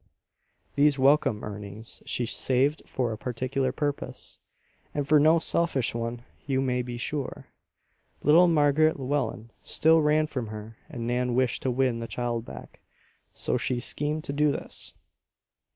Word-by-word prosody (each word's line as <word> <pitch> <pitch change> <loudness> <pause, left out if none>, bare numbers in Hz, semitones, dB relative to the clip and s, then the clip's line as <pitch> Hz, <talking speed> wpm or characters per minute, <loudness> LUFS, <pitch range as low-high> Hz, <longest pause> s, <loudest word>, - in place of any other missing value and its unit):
These 145 0 +3
welcome 135 -5 +3
earnings 105 +2 -5
she 120 - -1
saved 135 +5 +2
for 125 -3 -1
a 110 - -5
particular 130 +2 -1
purpose, 145 +1 -4 0.6
and 145 -1 -1
for 150 0 +6
no 155 +3 +5
selfish 165 -6 +1
one, 115 +1 -4 0.2
you 135 -2 +1
may 125 -2 0
be 120 -1 -6
sure. 140 +3 -4 0.7
Little 165 +5 +6
Margaret 155 -1 +3
Llewellen 130 -4 -2
still 160 +1 +3
ran 155 +1 +3
from 130 -6 -4
her 110 +1 -8
and 120 -7 -5
Nan 125 0 0
wished 130 -1 +1
to 130 - -1
win 125 -1 +1
the 115 - -5
child 120 -1 -3
back; - - -11 0.5
so - - -1
she 120 +1 -1
schemed 150 +5 -1
to 140 - -4
do 150 0 +3
this. - - -5
130 Hz, 150 wpm, -27 LUFS, 120-150 Hz, 0.7 s, for